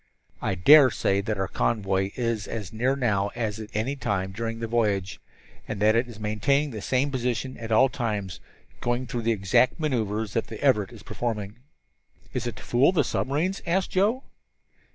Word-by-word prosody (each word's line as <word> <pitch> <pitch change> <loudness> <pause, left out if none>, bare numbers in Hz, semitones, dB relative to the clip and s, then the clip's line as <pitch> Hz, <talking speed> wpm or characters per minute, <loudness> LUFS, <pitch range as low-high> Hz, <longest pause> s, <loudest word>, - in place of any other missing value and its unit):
"I 95 - -1
dare 140 - +8
say 100 -3 0
that 105 0 -2
our 95 0 -1
convoy 95 -3 0
is 115 -4 -2
as 105 -5 -6
near 125 +4 +1
us - - -4
now 100 -5 +1
as 110 -3 -2
at 110 -1 -7
any 120 +6 -1
time 95 -7 -2
during 115 +3 -4
the 115 - -3
voyage, 105 -5 0 0.5
and 105 - -4
that 110 +2 +4
it 120 +2 +2
is 115 -3 -11
maintaining 120 +8 +1
the 110 -3 -6
same 135 +6 0
position 125 0 -2
at 115 -1 -6
all 120 +5 +6
times, 105 -7 -3 0.4
going 120 +1 -1
through 120 0 -3
the 115 +1 +1
exact 105 - +2
maneuvers 110 -8 -1
that 115 - -1
the 110 - -8
Everett 125 -8 +2
is 110 -3 -12
performing." 105 -3 -4 0.8
"It 125 -1 -2
is - - -1
to - - -12
fool 125 +7 +3
the 180 - +2
submarines?" 160 +8 -1
asked 185 +2 0
Joe. 215 +8 +1
115 Hz, 190 wpm, -26 LUFS, 105-130 Hz, 0.8 s, dare